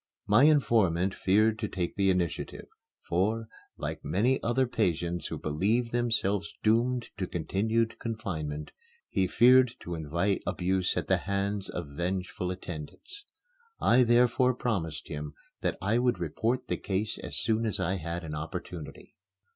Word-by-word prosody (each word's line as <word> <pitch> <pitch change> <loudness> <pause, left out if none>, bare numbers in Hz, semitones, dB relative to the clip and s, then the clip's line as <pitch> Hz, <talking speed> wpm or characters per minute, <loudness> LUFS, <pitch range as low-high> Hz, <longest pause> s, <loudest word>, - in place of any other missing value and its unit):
My 105 +7 +5
informant 100 - +3
feared 110 +3 +2
to 105 - -1
take 90 -3 -3
the 100 -1 +2
initiative, 90 -3 -1 0.4
for, 110 +6 0 0.3
like - - -5
many 105 - +1
other 130 +3 +2
patients 85 -7 -1
who - - -4
believe 105 +11 0
themselves 110 -5 0
doomed 120 +3 +2
to 95 - -2
continued 110 +7 0
confinement, 80 -10 -4 0.4
he 95 - +1
feared 125 +4 +5
to 85 - -5
invite 85 +5 -1
abuse 95 0 0
at - - 0
the - - +3
hands 100 0 -2
of 85 -5 -5
vengeful 90 +1 -2
attendants. 90 - -8 0.5
I 125 - +5
therefore 125 +1 +4
promised 95 -12 -2
him 75 0 -6 0.3
that - - -1
I 105 +4 +2
would 125 -1 +2
report 110 - -1
the - - -1
case 105 +2 -2
as - - -5
soon 110 0 +1
as 105 - -1
I 95 +3 0
had 85 +1 -4
an 80 -2 -6
opportunity. 80 +1 -7
100 Hz, 145 wpm, -29 LUFS, 85-115 Hz, 0.5 s, My